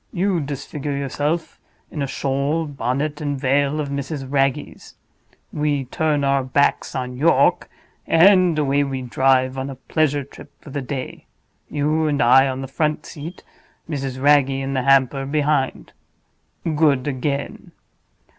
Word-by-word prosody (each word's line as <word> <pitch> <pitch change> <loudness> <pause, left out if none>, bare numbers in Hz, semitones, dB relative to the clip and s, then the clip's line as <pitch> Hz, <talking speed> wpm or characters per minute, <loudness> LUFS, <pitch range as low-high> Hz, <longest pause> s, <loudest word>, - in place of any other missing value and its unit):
You 190 -2 0
disfigure 145 0 -4
yourself 145 +4 -2 0.3
in 150 - -4
a 140 - -1
shawl, 140 +5 -1
bonnet, 145 +2 -3
and 145 -2 -2
veil 140 +2 +1
of 145 -2 -3
Mrs. 140 0 -4
Wragge's; 135 +1 -2 0.6
we 145 -2 0
turn 150 +2 0
our 140 -1 +2
backs 135 +2 +1
on 125 -1 -4
York; 160 +5 +3 0.4
and 180 0 +5
away 145 -1 +2
we 135 -2 -4
drive 130 +1 +2
on 135 +1 -4
a 135 - -7
pleasure 145 +2 0
trip 135 - -14
for 145 - -13
the 140 - -3
day—you 145 +3 -4
and 145 -1 0
I 130 +2 +6
on 130 0 -3
the 135 - -5
front 150 +3 -1
seat, 165 +4 -9 0.4
Mrs. 135 -4 -4
Wragge 145 0 +4
and 135 0 -3
the 130 - +1
hamper 135 +1 +3
behind. 145 -1 -1 0.7
Good 150 -4 +2
again. 140 +1 -3
140 Hz, 140 wpm, -21 LUFS, 135-150 Hz, 0.7 s, I